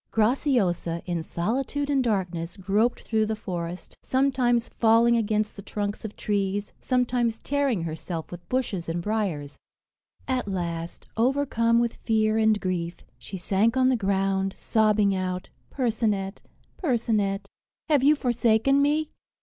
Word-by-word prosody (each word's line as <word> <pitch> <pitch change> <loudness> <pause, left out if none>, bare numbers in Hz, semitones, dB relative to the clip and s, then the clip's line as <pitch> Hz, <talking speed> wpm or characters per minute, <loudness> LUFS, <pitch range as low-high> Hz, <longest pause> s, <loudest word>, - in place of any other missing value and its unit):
Graciosa, 215 - +1
in 175 -2 -2
solitude 260 - -2
and 275 -2 +2
darkness, 180 -7 -2
groped 205 +5 +1
through 220 -1 +1
the 220 - -1
forest, 180 -4 -5
sometimes 255 -3 +2
falling 230 +1 +4
against 215 -1 0
the 200 - -8
trunks 205 +1 -4
of 215 -1 -6
trees, 200 0 -1
sometimes 245 -3 +1
tearing 275 -8 0
herself 160 0 -5
with 175 0 -10
bushes 220 -10 -1
and 165 +1 -1
briers; 175 -8 -2 0.7
at 255 -4 -1
last, 170 -3 -4
overcome 235 -2 +2
with 235 0 +1
fear 220 -1 +1
and 220 -1 +3
grief, 175 -2 -2 0.2
she 190 - -7
sank 205 +7 +1
on 260 0 +4
the 260 - +3
ground, 195 -2 0
sobbing 215 -2 +2
out, 185 0 -3 0.2
"Percinet, 215 -6 -1 0.4
Percinet, 220 - 0 0.4
have 295 -4 +4
you 295 +2 +6
forsaken 245 +1 +2
me?" 300 +2 +1
215 Hz, 135 wpm, -26 LUFS, 190-245 Hz, 0.7 s, you